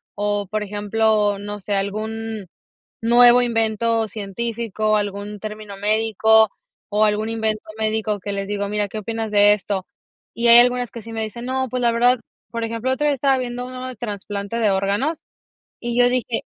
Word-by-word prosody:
o, 205 -1 -1
por 215 +1 -2
ejemplo, 210 0 +1
no 205 0 -6
sé, 205 - -3
algún 215 +1 -3 0.5
nuevo 240 +1 +7
invento 225 -1 +1
científico, 215 +1 -2
algún 205 0 -4
término 215 -1 -7
médico, 220 +1 +3 0.4
o 210 +1 +3
algún 215 +1 0
invento 220 -1 -1 0.2
médico 215 -1 -1
que 200 +2 -5
les 195 0 -3
digo: 200 -1 -2
“Mira, 210 0 -1
¿qué 215 - -6
opinas 225 0 -4
de 205 0 +6
esto?”. 195 -2 -3 0.5
Y 235 0 +1
hay 235 - +10
algunas 245 0 +2
que 235 - -8
sí 225 +1 -10
me 225 0 -2
dicen: 235 +3 -6
“No, 260 0 -1
pues, 250 +1 -2
la 235 -1 +3
verdad” 245 +1 +3 0.3
Por 230 0 -3
ejemplo, 230 +2 -2
el 260 - +3
otro 295 +2 -1
día 290 - +3
estaba 270 0 +2
viendo 245 0 -4
uno 255 0 -6
de 255 - -7
trasplante 205 -1 -5
de 215 -3 +3
órganos, 200 +11 0 0.6
y 240 0 -2
yo 245 - +6
dije: 250 0 -1
220 Hz, 180 wpm, -21 LUFS, 205-235 Hz, 0.6 s, hay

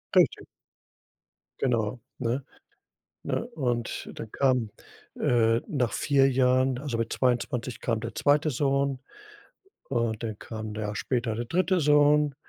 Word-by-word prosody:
Richtig. - - +4 1.1
Genau, 120 -2 0 0.2
ne? 125 +2 -1 0.8
Ne? - - -2
Und 120 -6 -2
dann 110 - -7
kam, 130 -5 +1 0.5
äh, 115 -1 +3
nach 135 - -1
4 135 -2 +3
Jahren 130 0 +2
also 135 -4 -3
mit 115 0 -2
22 125 0 -1
kam 115 -2 -1
der 115 0 -6
2. 150 +2 +3
Sohn 140 0 0 0.9
und 115 -3 -1
dann 110 -2 -4
kam 110 -1 -6
'n - - -9
Jahr 105 -1 -3
später 120 -1 -1
der 120 +1 -3
3. 185 +6 +1
Sohn. 150 -1 +4
125 Hz, 130 wpm, -27 LUFS, 115-140 Hz, 1.1 s, Richtig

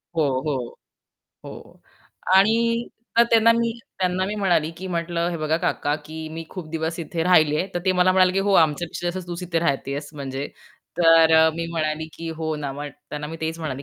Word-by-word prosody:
हो, 160 - +2 0.2
हो. 130 -5 -3 0.7
हो - - -12 0.6
आणि 230 +4 +3 0.3
तर 235 - +8
त्यांना 230 0 +6
मी 230 0 +1 0.3
त्यांना 185 0 0
मी 210 - -3
म्हणाले, 175 -6 +1
की 190 - -7
म्हटलं, 170 -1 -1
"हे 170 - -3
बघा 155 0 0
काका, 150 -4 -1
की 160 +1 -7
मी 165 0 -6
खूप 180 -5 -7
दिवस 165 +1 -3
इथे 165 0 -3
राहिले 155 -4 +4
आहे." 185 - 0
तर - - +1
ते 185 - +3
मला 185 0 +3
म्हणाले, 185 -1 +4
की 195 - 0
"हो, 200 +1 +1
आमच्यापेक्षा 165 +2 -1
जास्त 180 0 -6
तूच 175 +1 -5
इथे 170 -2 -1
राहते 140 -4 -1
आहेस." 145 +1 -5
म्हणजे. 135 -1 -5 0.5
तर 165 -1 +6
अ, 160 0 +6
मी 165 0 -3
म्हणाले, 155 -1 -2
की 165 - -7
"हो 160 -1 -2
ना." 145 -2 -4
मग 145 +1 -6 0.2
त्यांना 150 0 -4
मी 160 - -7
तेच 160 +1 -3
म्हणाले, 140 -4 -5
165 Hz, 205 wpm, -23 LUFS, 155-185 Hz, 0.7 s, तर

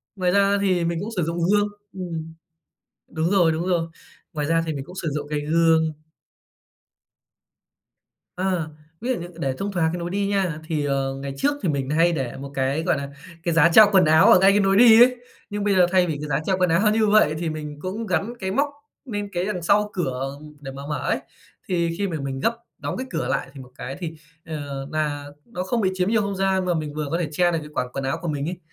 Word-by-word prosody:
Ngoài 180 -2 +1
ra 200 +1 +3
thì 185 -3 +1
mình 170 0 -1
cũng 210 - -4
sử 175 - +2
dụng 170 +2 -2
gương 205 0 +3 0.3
ửm, 165 -4 -6 0.8
đúng 160 +3 -1
rồi, 175 -5 +4
đúng 165 +3 -2
rồi. 170 -3 0 0.4
Ngoài 150 -2 -2
ra 165 +1 +2
thì 160 - -1
mình 135 -1 -5
cũng 180 - -12
sử 165 - -1
dụng 145 0 -4
cái 150 0 -1
gương. 160 +1 +3 2.4
Ờ, 180 -3 -1 0.3
ví 245 - -3
dụ 255 - +2
như 175 - -6
để 135 -4 -1
thông 200 +1 -3
thoáng 170 -4 +1
cái 175 - -3
nối 170 0 -4
đi 200 +1 -1
nha, 190 -6 0
thì, 155 -3 -1
ờ, 135 -1 -1
ngày 135 0 -5
trước 285 - +2
thì 180 - +1
mình 135 -3 -1
hay 165 +3 +3
để 130 -6 -3
một 140 0 -8
cái, 135 +4 0
gọi 160 - +1
là, 140 0 -5 0.3
cái 170 - 0
giá 165 0 +5
treo 215 - +10
quần 190 -2 +5
áo 160 +8 +6
ở 185 - +8
ngay 195 +1 +6
cái 205 - +3
nối 195 0 +3
đi 230 -1 +8
ấy. 250 +1 +6 0.3
Nhưng 205 -1 -3
bây 200 -1 +2
giờ 180 - +6
thay 185 -1 +4
vì 160 - -1
cái 150 - -4
giá 135 0 +1
treo 190 -1 +1
quần 180 -1 +2
áo 190 +6 +3
như 220 -1 +2
vậy, 205 -7 +4
thì 170 -1 -2
mình 150 -1 -6
cũng 200 +5 -4
gắn 220 +2 -1
cái 190 -1 -3
móc 280 +8 +1 0.4
nên 205 -5 -4
cái 175 0 -1
đằng 190 -4 -3
sau 210 +5 +2
cửa 135 -5 -3 0.2
để 135 -2 -7
mà 135 +1 -8
mở 150 - -2
ấy. - - +1 0.5
Thì 170 -2 0
khi 200 - 0
mà 165 -4 -3
mình 135 -1 -4
gấp 230 +11 0 0.2
đóng - - -4
cái 260 +1 -4
cửa 165 -2 -2
lại, - - -1
thì 140 - -10
một 130 0 -14
cái 135 +2 -6
thì, 165 -3 -4 0.3
ờ, 140 -4 -5
nà 150 -2 -2 0.2
nó 180 -6 -5
không 230 +5 -1
bị 190 - +2
chiếm 185 +1 0
nhiều 220 -1 +3
không 200 -1 -2
gian, 190 -1 +1
mà 180 - +1
mình 155 -3 -3
vừa 150 0 -3
có 165 - +1
thể 165 -4 -2
che 175 +3 +2
được 165 - 0
cái 150 - -10
quả 125 - -1
quần 135 - -3
áo 135 +1 -1
của 175 - -4
mình 145 -2 -2
ấy. 180 0 -6
170 Hz, 250 wpm, -23 LUFS, 150-195 Hz, 2.4 s, treo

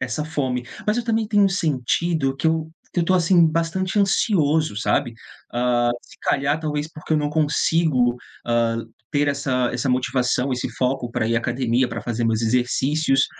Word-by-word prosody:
essa 130 +4 -2
fome. 130 -5 -2 0.2
Mas 210 - +2
eu 240 - -1
também 225 -2 0
tenho 205 -2 +4
sentido 155 -3 0
que 150 - -1
eu 160 0 -1 0.2
que 175 - 0
eu - - +2
estou, 185 +3 +2
assim, 170 -1 +4
bastante 170 +5 -1
ansioso, 160 - +2
sabe. 115 +2 0 0.4
Hã, 120 0 +1
se - - -18
calhar, 140 +2 +1
talvez 150 -1 -3
porque 155 0 -6
eu 155 - +3
não 150 - 0
consigo, 150 -4 +2 0.3
hã, 115 -1 +1 0.3
ter 145 -1 +1
essa 130 -3 0
essa 125 +3 -2
motivação, 125 +1 0
esse 125 0 -2
foco 125 -1 -1
pra 120 -2 -1
ir 115 - +1
à - - +4
academia, 120 +1 0
pra 115 0 -5
fazer 120 +1 -2
meus 110 -1 +1
exercícios, 135 +4 +1
140 Hz, 175 wpm, -22 LUFS, 125-160 Hz, 0.4 s, tenho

